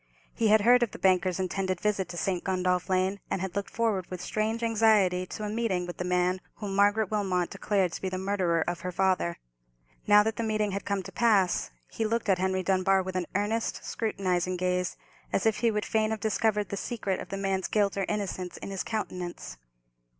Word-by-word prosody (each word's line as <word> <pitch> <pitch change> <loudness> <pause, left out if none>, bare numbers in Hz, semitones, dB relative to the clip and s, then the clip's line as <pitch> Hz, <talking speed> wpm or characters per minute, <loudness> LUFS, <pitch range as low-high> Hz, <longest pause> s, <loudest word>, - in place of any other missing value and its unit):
He 225 - +1
had 215 0 +5
heard 245 +3 +6
of 240 - +2
the - - -7
banker's 185 0 +2
intended 185 0 -1
visit 200 -3 0
to 175 - -6
St. 180 -1 -1
Gundolph 180 -1 0
Lane, 190 +2 +1
and - - -1
had 190 0 -4
looked 200 -1 -2
forward 210 -6 -1
with 185 - -5
strange 220 +5 -2
anxiety 210 -5 +3
to 215 - -6
a - - -2
meeting 210 -6 0
with 175 - -7
the - - -2
man 180 +1 +1
whom 200 -3 -5
Margaret 205 +1 +3
Wilmot 190 -4 0
declared 195 -4 0
to - - -6
be 190 - -1
the 185 - -3
murderer 185 -3 +1
of 175 0 -2
her 180 - -4
father. 185 - +1 0.7
Now 210 0 +7
that 220 +1 -2
the 230 - -1
meeting 215 -2 0
had 200 +1 -4
come 200 -1 -1
to - - -9
pass, 205 -6 +2 0.2
he - - -2
looked 225 0 -1
at 185 -2 +3
Henry 190 0 0
Dunbar 190 +1 +2
with 185 0 -6
an 180 -2 -1
earnest, 215 +3 -1
scrutinizing 185 -4 -1
gaze, 180 0 -1 0.3
as 195 - 0
if 220 -1 +3
he 235 - +2
would 210 -1 -1
fain 215 -1 +1
have 220 0 -2
discovered 210 -1 0
the 200 - -3
secret 200 -4 -2
of - - -8
the 195 - -4
man's 195 -1 -1
guilt 205 -2 +1
or 195 -1 0
innocence 190 -3 -3
in - - -7
his 195 - -2
countenance. 180 - -5
195 Hz, 215 wpm, -28 LUFS, 185-215 Hz, 0.7 s, Now